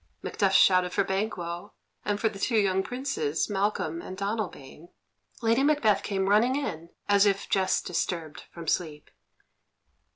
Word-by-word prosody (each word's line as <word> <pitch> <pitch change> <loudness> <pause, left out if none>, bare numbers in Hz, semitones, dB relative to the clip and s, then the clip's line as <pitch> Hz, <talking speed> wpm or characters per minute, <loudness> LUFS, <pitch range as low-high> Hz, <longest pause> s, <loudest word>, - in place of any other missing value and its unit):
Macduff 195 -2 0
shouted 185 -1 +5
for 200 - +2
Banquo, 190 -2 -3 0.3
and 205 0 -1
for 225 - +2
the 205 -2 -5
two 230 +2 +1
young 190 -2 +2
Princes, 220 - -2
Malcolm 195 -5 -1
and 185 - -8
Donalbain. 190 -7 -5 0.5
Lady 230 +3 +3
Macbeth 280 -8 +3
came 195 -2 -1
running 220 +6 +4
in, 170 - -4 0.2
as 200 0 +5
if 195 0 0
just 190 -1 +1
disturbed 165 -3 -3
from 170 -1 -9
sleep. 155 -3 -2
195 Hz, 140 wpm, -27 LUFS, 175-215 Hz, 0.5 s, shouted